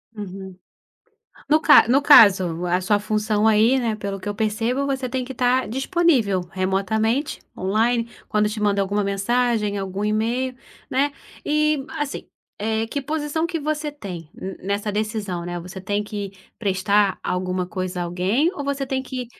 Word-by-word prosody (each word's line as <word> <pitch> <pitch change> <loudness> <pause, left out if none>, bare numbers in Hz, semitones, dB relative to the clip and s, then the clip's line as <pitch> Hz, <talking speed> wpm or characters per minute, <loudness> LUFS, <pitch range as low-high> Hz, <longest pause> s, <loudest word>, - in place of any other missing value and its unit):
Uhum. 190 -2 -8 0.9
No 310 +1 +4
ca 300 - +7
no 265 +4 +4
caso, 190 - +6
a 180 +1 +1
sua 205 +3 +2
função, 215 0 0
aí, 220 +4 +4
né, 230 -4 -1
pelo 200 -2 -5
que 185 - -6
eu 205 - -2
percebo, 225 +5 -1
você 265 -2 -2
tem 255 +1 -2
que 265 - -7
estar 255 +1 +1
disponível 265 - +2
remotamente, 215 +8 0 0.2
on-line, 230 +5 +1 0.2
quando 210 0 +2
eu - - -1
te 215 - -5
mando 205 -1 +2
alguma 200 +2 0
mensagem, 210 +1 0
algum 195 +1 -3
e-mail, 230 +5 0 0.3
né. 280 +2 +1 0.3
E, 305 -1 +1
assim, 295 -1 -4 0.3
eh, 220 +1 -1
que 280 +5 -4
posição 305 +2 -1
que 335 -1 -3
você 300 0 -2
tem 180 - -8
n 190 - -7
nessa 200 +2 -2
decisão, 210 -4 -3
né, 175 0 -4
você 185 +2 -8
tem 205 +2 -1
que 205 -2 -5 0.3
prestar 200 0 +1
alguma 180 0 -2
coisa 185 -1 -4
a - - -1
alguém, 190 - +1
ou 285 - -5
você 280 -1 -2
tem 265 0 -2
que 255 -1 -5
215 Hz, 165 wpm, -22 LUFS, 195-260 Hz, 0.9 s, ca